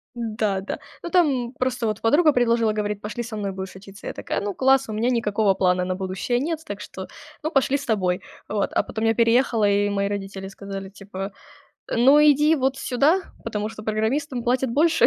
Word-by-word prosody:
Да-да. 215 -4 -2 0.2
Ну, 345 - -5
там 270 -9 +2
просто 255 -2 0
вот 215 0 -2
подруга 300 +7 +5
предложила, 230 -3 +2
говорит: 210 -1 -2
"Пошли 220 +3 -4
со 225 -2 -6
мной 200 -2 -2
будешь 190 0 -6
учиться". 195 +1 -12
Я - - -3
такая: - - -3
"Ну, 205 0 -2
класс, 270 -1 +3
у - - -4
меня 225 +3 0
никакого 210 -4 +2
плана 180 -1 +2
на 185 0 -2
будущее 190 +6 -2
нет, 320 +3 -2
так 205 0 -6
что, 190 -2 -8 0.3
ну, 310 - -1
пошли 275 0 +2
с 275 - -8
тобой". 185 -4 +1 0.3
Вот. 205 -1 -1
А - - +3
потом 220 0 -4
я 225 - +3
переехала, 230 -2 +3
и 205 0 +2
мои 200 0 0
родители 195 -1 -5
сказали 195 -1 -7
типа: 195 -1 -7 0.6
"Ну, 265 +5 +6
иди 300 +1 +5
вот 265 0 0
сюда, 280 +8 +2 0.2
потому 210 -2 -2
что 215 -1 -9
программистам 240 +5 -1
платят 250 +1 +1
больше" 320 +6 +4
220 Hz, 195 wpm, -23 LUFS, 200-260 Hz, 0.6 s, Ну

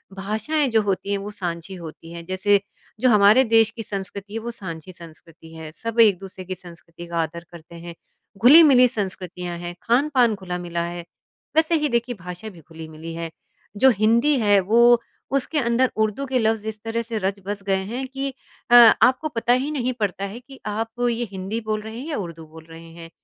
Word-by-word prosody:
भाषाएँ 220 +10 -1
जो 220 -1 +4
होती 200 0 -2
हैं 200 - +1
वो 205 +1 -6
साँझी 175 -1 -5
होती 165 -1 -10
हैं। 170 0 -8
जैसे 190 +3 +2 0.4
जो 255 0 +3
हमारे 210 +3 +6
देश 225 -1 +6
की 225 -1 -7
संस्कृति 200 0 -7
है, 225 - -2
वो 235 +1 -5
साँझी 185 -5 -8
संस्कृति 165 -1 -14
है, 160 -1 -9
सब 230 +6 -5
एक-दूसरे 190 -3 +2
की 185 0 -5
संस्कृति 170 -1 -12
का 170 0 -5
आदर 170 +2 -7
करते 170 0 -13
हैं, 170 0 -9 0.4
घुली-मिली 260 - +7
संस्कृतियाँ 185 -5 -5
हैं, 175 0 -6
खान-पान 245 -2 +2
घुला-मिला 175 -2 -4
है, 175 0 -6 0.5
वैसे 320 +1 +3
ही 300 -2 +1
देखिए 235 +1 -1
भाषा 180 +4 -7
भी 175 -5 -15
घुली-मिली 160 +1 -10
है। 165 -1 -5 0.5
जो 265 - +6
हिंदी 235 +6 +4
है 205 -3 +4
वो 235 +5 +5 0.4
उसके 295 +3 0
अंदर 240 +1 +1
उर्दू 220 +5 0
के 260 -1 0
लफ्ज़ 220 -1 0
इस 215 -1 -6
तरह 225 +1 -2
से 230 -1 -5
रच-बस 200 +1 -3
गए 190 -1 +1
हैं 260 +2 -3
कि 270 +1 -4 0.4
अ, - - +8
आपको 250 +5 +6
पता 240 -2 +1
ही 260 +4 0
नहीं 255 -4 -1
पड़ता 200 -2 -2
है 200 +4 -7
कि 265 +2 -15
आप 225 +3 -4
ये 235 +1 -1
हिंदी 195 +4 -4
बोल 215 -1 -2
रहे 220 +2 -8
हैं 275 - -7
या 295 - -2
उर्दू 165 -4 -7
बोल 160 +1 -14
रहे 165 0 -11
हैं। 165 0 -11
205 Hz, 195 wpm, -22 LUFS, 175-235 Hz, 0.5 s, अ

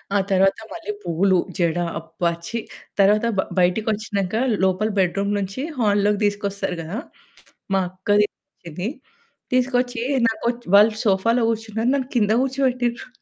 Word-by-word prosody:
ఆ - - +5
తరువాత 195 +2 +3
మళ్ళి 335 +5 -5
పూలు, 185 +3 +2 0.2
జడ. 170 0 +1 0.2
అబ్బా! 165 +1 -2 0.2
ఛి. 230 - -3 0.4
తరువాత 210 +3 +4 0.3
బయటికొచ్చినంక 205 +1 0 0.3
లోపల 190 +4 +1
బెడ్‌రూమ్ 195 +2 +1
నుంచి 195 +6 -4 0.2
హాలోకి 205 -1 +2
తీసుకొస్తారు 200 -2 -2
గదా! 180 +9 -5 0.8
మా 195 - +4
అక్కది 205 +3 +2 0.4
ఇది. 180 +8 -3 0.6
తీసుకొచ్చి 250 -1 +1 0.3
నాకొచ్చి 235 +2 -2
వాళ్ళు 215 +2 +7
సోఫాలో 220 +5 +2
కూర్చున్నారు. 225 +2 -1
నన్ను 265 -1 -2
కింద 210 -1 +2
కూర్చోపెట్టిర్రు. 255 -2 -1
210 Hz, 120 wpm, -22 LUFS, 190-235 Hz, 0.8 s, వాళ్ళు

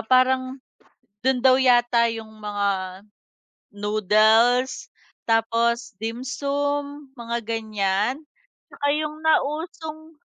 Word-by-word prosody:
parang 255 +2 +2 0.6
dun 255 0 0
daw 260 0 +6
yata 240 -2 +4
yung 220 -1 -7
mga 200 -2 -3 0.7
noodles, 215 +5 +2 0.4
tapos 230 +2 +1
dimsum, 280 +4 -3
mga 235 -2 -4
ganiyan. 215 +1 -1 0.6
Tsaka 285 - -2
yung 305 0 -4
nausong, 315 +1 -2
240 Hz, 80 wpm, -23 LUFS, 220-280 Hz, 0.7 s, daw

